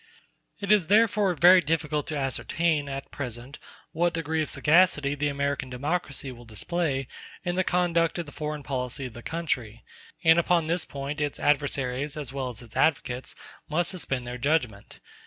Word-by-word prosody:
It 200 0 -1
is 205 -6 +5
therefore 210 -3 +4
very 180 +3 +7
difficult 150 -1 -1
to 155 - -2
ascertain, 145 +2 0
at 135 0 -6
present, 125 0 -7 0.3
what 170 +1 +1
degree 160 -1 -1
of 155 - -2
sagacity 150 -3 +4
the 145 0 -1
American 140 -1 -2
democracy 140 +1 -2
will 120 -1 -12
display 135 - -2 0.4
in 175 - 0
the 185 +1 +1
conduct 175 -2 +1
of 170 - -3
the 145 - -11
foreign 150 -1 -4
policy 130 0 -3
of 125 - -7
the 120 - -9
country; 120 -8 -3 0.4
and 165 +1 +6
upon 170 -1 +2
this 170 +2 0
point 140 +2 -5
its 145 -1 -2
adversaries, 140 -1 0
as 140 -4 -5
well 135 -2 -2
as 120 -1 -8
its 115 -2 -15
advocates, 130 -5 0 0.3
must 170 +3 +1
suspend 135 -9 -3
their 125 +1 -6
judgment. 125 -7 -1
145 Hz, 170 wpm, -27 LUFS, 135-170 Hz, 0.4 s, very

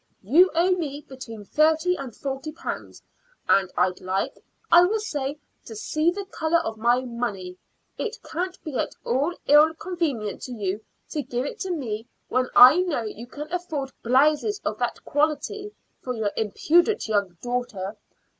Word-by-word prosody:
You 325 - +6
owe 350 +3 +3
me 300 -5 -2
between 230 -5 -9
thirty 320 - +3
and 265 -9 -7
forty 275 +2 -4
pounds, 325 - -7 0.4
and 190 -2 +3
I'd 180 0 +1
like, 185 +1 -1 0.4
I 345 - +9
will 405 +5 +2
say, 290 -9 -3 0.3
to 225 - -9
see 310 +9 +1
the 395 +3 -3
color 330 -3 +1
of 225 -10 -3
my 240 +2 +3
money. 235 -7 -4 0.4
It 455 +1 -3
can't 365 +2 -3
be 305 -4 -6
at - - -2
all 285 +8 +1
ill 305 +2 +6
convenient 325 - -3
to 255 - -6
you 205 -2 -2 0.3
to 300 - -1
give 250 -1 -3
it - - -6
to 380 - -3
me 235 -9 -3 0.2
when 255 +1 +1 0.7
you 235 +3 -9
can 300 +6 -8
afford 310 -7 -3
blouses 300 - +3
of - - -2
that - - -2
quality 310 +8 -1 0.3
for 250 -1 -3
your 215 -3 -1
impudent 340 - +2
young 200 -5 0
daughter. 245 -5 -3
275 Hz, 155 wpm, -25 LUFS, 225-335 Hz, 0.7 s, I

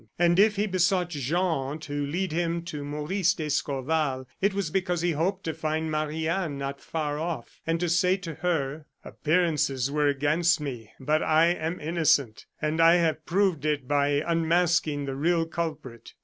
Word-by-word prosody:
And 175 +1 +3
if 210 +1 +5
he 205 +1 +1
besought 180 -2 +1
Jean 150 -1 -1
to 145 -2 -3
lead 180 +4 -2
him 170 +1 -1
to 150 -4 -6
Maurice 160 +6 0
d'Escorval, 145 -2 -1
it 200 +2 +3
was 195 -5 -2
because 180 -2 0
he 175 0 +1
hoped 180 +5 -1
to 160 - -2
find 155 0 -2
Marie 155 +1 -2
Anne 170 -4 -1
not 140 0 -5
far 150 -2 -3
off, 160 -7 -5
and 165 0 +1
to 175 - 0
say 180 +3 +3
to 175 -4 -7
her: 150 -3 -2 0.2
"Appearances 150 -5 0
were 150 0 +2
against 150 +5 +2
me, 120 -7 -6
but 150 +4 +1
I 160 +2 +4
am 170 0 -2
innocent; 150 -9 +1
and 155 +1 0
I 165 +1 +7
have 160 -3 0
proved 185 -5 +1
it 150 -4 -1
by 145 +1 +2
unmasking 165 -3 +1
the 135 - -3
real 165 +4 +1
culprit." 155 -8 -6
160 Hz, 170 wpm, -27 LUFS, 145-175 Hz, 0.2 s, I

